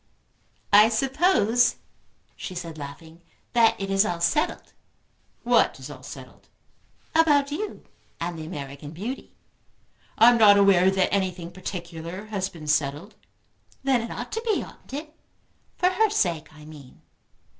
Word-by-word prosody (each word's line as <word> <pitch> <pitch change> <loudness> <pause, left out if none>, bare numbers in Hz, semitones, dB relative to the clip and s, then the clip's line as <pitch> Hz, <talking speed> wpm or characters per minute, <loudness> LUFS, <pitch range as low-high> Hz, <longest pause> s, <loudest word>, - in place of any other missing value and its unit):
"I 210 +2 +8
suppose," 245 - +2 0.6
she 185 - -7
said, 165 -3 -7
laughing, 160 +4 -10 0.3
"that 230 -2 +4
it 195 0 -3
is 195 +1 +4
all 175 -5 -2
settled." 300 - 0 0.7
"What - - +3
is - - -9
all - - -11
settled?" - - -12 0.7
"About 295 -3 +3
you 410 +8 -5 0.4
and 170 +1 -3
the 155 - -7
American 140 -3 -7
beauty." 225 +11 -7 0.8
"I 230 +2 +8
am 240 - +2
not 205 -2 +7
aware 190 -2 +5
that 190 -1 +1
anything 180 -3 -2
particular 175 0 -7
has 200 -3 -3
been 165 -4 -11
settled." 150 +6 -1 0.7
"Then 265 -3 +2
it 230 - -6
ought - - -6
to 450 - -3
be, 455 -2 0
oughtn't - - -15
it? 300 +3 -6 0.6
For 360 - +3
her 435 +3 +2
sake, 175 - -1
I 155 -1 -15
mean." 150 -4 -14
195 Hz, 145 wpm, -25 LUFS, 165-245 Hz, 0.8 s, I